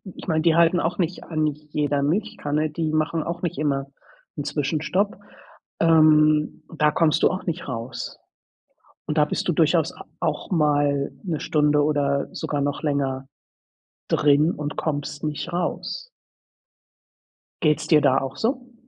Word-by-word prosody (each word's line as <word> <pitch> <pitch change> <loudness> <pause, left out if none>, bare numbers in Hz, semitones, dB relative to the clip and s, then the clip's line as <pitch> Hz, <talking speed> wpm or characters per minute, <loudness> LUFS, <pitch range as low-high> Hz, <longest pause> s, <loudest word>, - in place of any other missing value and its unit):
ich - - -10
meine, 160 -2 +1
die 165 -1 +3
halten 170 +1 +4
auch 175 +1 -1
nicht 175 -1 -2
an 155 -2 -1
jeder 150 -1 -1
Milchkanne. 155 -3 -1
Die 155 0 -2
machen 155 +1 0
auch 170 +1 -5
nicht 170 - -2
immer 140 -2 0 0.5
'n 145 - -2
Zwischenstopp. 150 +7 -1 0.6
Ähm, 155 -2 +4
da 150 -1 +3
kommst 160 -2 +2
du - - +6
auch 185 - -4
nicht 170 -2 -4
raus. 120 0 -5 0.9
Und - - -2
da - - +5
bist - - -3
du - - +3
durchaus - - +2
a - - -12 0.2
auch - - -2
mal 145 -4 +1
1 165 -5 -2
Stunde 150 -1 +2
oder 140 -2 +1
sogar 145 -1 -2
noch 145 0 -1
länger 135 -3 -1 0.8
drin 150 +2 +4
und 145 0 -5
kommst 145 -1 -3
nicht 150 +3 -3
raus. 175 - -3 1.6
Geht's 150 -2 +2
dir 155 -3 +5
da 135 -2 +4
auch 135 0 -3
so? 250 +1 -2
150 Hz, 150 wpm, -23 LUFS, 145-165 Hz, 1.6 s, du